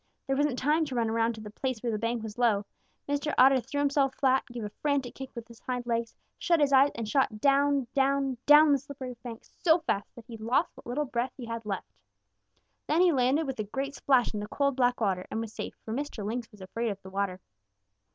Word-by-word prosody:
There 270 - 0
wasn't 285 -2 +1
time 300 +5 +2
to 270 -4 -5
run 230 -2 +1
around 230 0 +1
to 220 - -9
the 210 -1 -9
place 255 +1 -3
where 235 - 0
the 215 - -2
bank 230 0 -1
was 220 +1 -7
low. 215 -4 +2 0.4
Mr. 285 +1 -1
Otter 265 +1 +7
threw 265 +4 -6
himself 280 -1 +2
flat, 265 -1 +3
gave 240 -2 -6
a 210 - -5
frantic 285 -4 0
kick 265 -1 -8
with 235 -1 -7
his 235 -1 -15
hind 250 -1 -4
legs, 230 -1 -2 0.2
shut 340 -2 +2
his 285 -2 +3
eyes, 270 +1 +7
and 230 -2 -4
shot 215 -3 +1
down, 280 +1 +3
down, 270 -2 +1
down 295 +1 +8
the 280 - +4
slippery 260 -2 -8
bank 230 -2 -8
so 325 -2 +2
fast 205 -10 -1
that 235 - -12
he 230 -2 -9
lost 230 +4 0
what - - -14
little 280 +5 -1
breath 250 0 -2
he 250 - -7
had 230 -1 -6
left. 195 -2 -4 0.9
Then 315 +3 +3
he 360 -1 +6
landed 270 +3 +2
with 270 -4 -5
a - - 0
great 270 +7 -4
splash 265 -4 +2
in 210 - -3
the 210 - -5
cold, 280 +3 0
black 250 -1 +2
water 190 -5 0
and 220 - -3
was 225 -1 -5
safe, - - -6
for 220 - -4
Mr. 265 -5 -4
Lynx 235 +2 -4
was 210 -3 -16
afraid 230 +5 -3
of 200 -2 -4
the 190 - -10
water. 195 -1 -2
250 Hz, 240 wpm, -29 LUFS, 225-280 Hz, 0.9 s, down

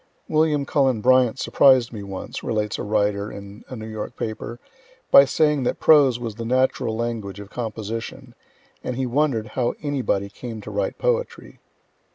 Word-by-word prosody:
"William 155 -2 +2
Cullen 135 -5 +2
Bryant 130 +1 +4
surprised 130 -3 +4
me 105 - -6
once," 95 -1 -7
relates 105 -2 -2
a - - -3
writer 105 -1 0
in 100 +2 -10
a 130 - -6
New 110 -2 -7
York 110 +1 -6
paper, 115 +2 -5 0.5
"by 140 - +9
saying 150 +1 +2
that 125 - -1
prose 140 -6 +5
was 120 -2 -5
the 115 +2 -7
natural 125 -2 0
language 110 -4 -4
of 100 0 -10
composition, 115 +2 -6 0.5
and 125 - -3
he 130 +1 -1
wonder'd 125 -4 0
how 120 -2 -1
anybody 130 -9 -1
came 115 +2 -8
to - - -8
write - - -2
poetry." - - -2
120 Hz, 165 wpm, -23 LUFS, 110-135 Hz, 0.5 s, by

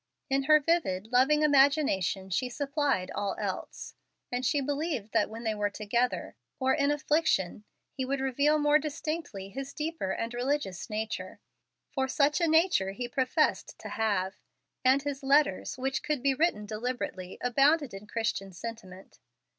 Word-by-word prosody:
In 270 0 +2
her 305 +1 +7
vivid, 275 - 0
loving 270 +5 +4
imagination 270 - +3
she 250 +8 0
supplied 280 -7 -1
all 200 -1 -2
else, - - -5 0.4
and 250 +1 -2
she 285 +3 +2
believed 280 -5 -2
that 225 -2 +2
when 225 +2 -8
they 220 -1 0
were 210 -1 -2
more - - +2
together, 235 +4 -1 0.2
or 265 0 +2
in 280 0 +2
affliction, 295 - +1 0.3
he 265 - -3
would 270 +1 -1
reveal 280 +3 +2
more 295 0 +4
distinctly 300 - -4
his 270 +6 -7
deeper 310 -9 -3
and 230 +4 -3
religious 245 -7 -2
nature, 215 -4 -4 0.5
for 265 -1 0
such 290 +4 +2
a 335 - +3
nature 320 - +3
he 245 +4 -4
professed 260 +4 0
to - - -8
have; 200 -4 0 0.5
and 265 +2 +4
his 280 -1 -3
letters, 285 +1 +2
which 270 +1 -1
could 300 -4 -2
be 275 -1 +3
written 275 -7 +1
deliberately, 215 -4 -4
abounded 275 +2 +3
in 195 +2 -9
Christian 210 -3 -2
sentiment. 190 -1 -9
260 Hz, 155 wpm, -29 LUFS, 210-290 Hz, 0.5 s, her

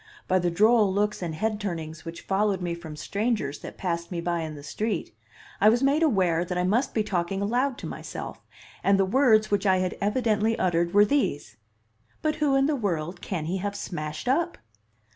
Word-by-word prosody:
By 185 0 +3
the 175 -1 +1
droll 210 +3 +4
looks 205 +1 0
and 165 -3 -3
head 215 +4 -1
turnings 160 -5 -5
which 165 0 -7
followed 200 0 +1
me 175 -2 -2
from 165 -3 -8
strangers 200 -2 -2
that - - -9
passed 170 -2 -2
me 175 - -2
by 170 0 -1
in 160 -2 -4
the 145 - -10
street, 210 - -3 0.4
I 210 - +6
was 240 +4 +2
made 280 +3 +3
aware 185 - +2
that 180 0 -3
I 180 - +1
must 220 +9 +1
be 220 - +2
talking 190 -1 -1
aloud 245 +6 0
to - - -8
myself, - - -7 0.4
and 195 0 +4
the 195 - +3
words 215 -1 +4
which 205 0 +1
I 190 -1 +4
had 185 0 -2
evidently 215 +1 +1
uttered 170 0 +1
were 205 0 +7
these: 145 - -1 0.7
"But 310 0 0
who 295 -3 +2
in 270 0 +4
the 300 +1 +1
world 175 - -2
can 170 -6 -3
he 180 +4 -1
have 200 +2 -3
smashed 155 -1 -5
up?" 335 +7 +1
195 Hz, 200 wpm, -26 LUFS, 170-220 Hz, 0.7 s, were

